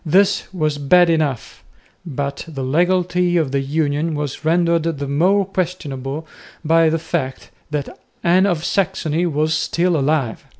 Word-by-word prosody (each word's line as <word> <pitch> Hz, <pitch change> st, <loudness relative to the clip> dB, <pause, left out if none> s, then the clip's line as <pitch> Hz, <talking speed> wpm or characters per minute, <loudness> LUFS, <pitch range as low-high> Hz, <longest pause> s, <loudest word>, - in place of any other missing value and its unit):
This 190 Hz, +4 st, +2 dB
was 155 Hz, -5 st, -1 dB
bad 175 Hz, +4 st, +5 dB
enough, 150 Hz, -7 st, -2 dB, 0.4 s
but 140 Hz, -4 st, -4 dB
the 140 Hz, -5 st, -5 dB
legality 180 Hz, +4 st, +1 dB
of 155 Hz, -5 st, 0 dB
the 140 Hz, -, +1 dB
union 150 Hz, +2 st, -1 dB
was 145 Hz, -1 st, -4 dB
rendered 170 Hz, +1 st, +2 dB, 0.2 s
the 140 Hz, 0 st, -4 dB
more 185 Hz, +8 st, +2 dB
questionable 160 Hz, -6 st, -4 dB, 0.4 s
by 165 Hz, +1 st, +4 dB
the 165 Hz, -, +1 dB
fact 135 Hz, -5 st, -4 dB, 0.2 s
that 150 Hz, -2 st, -4 dB, 0.2 s
Anne 185 Hz, +3 st, +4 dB
of 170 Hz, -4 st, -1 dB
Saxony 175 Hz, -3 st, 0 dB
was 155 Hz, 0 st, 0 dB
still 170 Hz, +2 st, +1 dB
alive. 140 Hz, -5 st, 0 dB
160 Hz, 140 wpm, -19 LUFS, 145-175 Hz, 0.4 s, bad